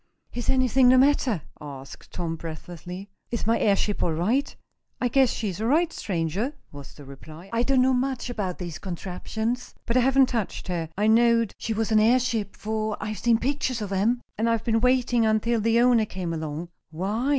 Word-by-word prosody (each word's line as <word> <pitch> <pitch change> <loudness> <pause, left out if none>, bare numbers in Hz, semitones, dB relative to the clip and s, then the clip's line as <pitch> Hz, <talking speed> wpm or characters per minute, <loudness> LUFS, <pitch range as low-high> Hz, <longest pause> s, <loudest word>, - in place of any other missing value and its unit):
"Is 245 - -3
anything 260 -1 +4
the 255 - +6
matter?" 260 - +3 0.2
asked 140 -2 -10
Tom, 170 -2 -3
breathlessly. 175 +4 -8 0.2
"Is 235 - -3
my 230 +1 +2
airship 205 0 +1
all 165 - +1
right?" 220 - 0 0.4
"I 250 - +1
guess 265 +1 +4
she's 210 -4 -3
all 225 - 0
right, 325 +5 +2
stranger," 190 - -2 0.2
was 140 -1 -11
the 145 - -12
reply. 155 +6 -12
"I 230 - +2
don't 255 +1 +3
know 260 0 +3
much 255 0 -1
about 205 -7 -3
these 175 -3 -6
contraptions, 220 +7 -4
but 235 - -1
I - - +6
haven't 265 +1 +5
touched 225 -5 -3
her. 165 -3 -2
I 210 - +1
knowed 230 0 +4
she 225 - -2
was 225 +1 -1
an 215 - +5
airship, 230 -2 +2
for 215 0 -2
I've 215 -1 -4
seen 235 -1 +3
pictures 260 -1 -1
of 205 -2 -5
'em, 225 +6 +1 0.2
and 230 +1 +2
I've 230 -1 0
been 225 -1 +1
waiting 250 -1 +3
until 220 +1 +1
the 230 +2 +3
owner 240 -2 +4
came 180 -4 -4
along." 160 +1 -5 0.2
"Why?" 200 - -2
220 Hz, 190 wpm, -25 LUFS, 180-245 Hz, 0.4 s, the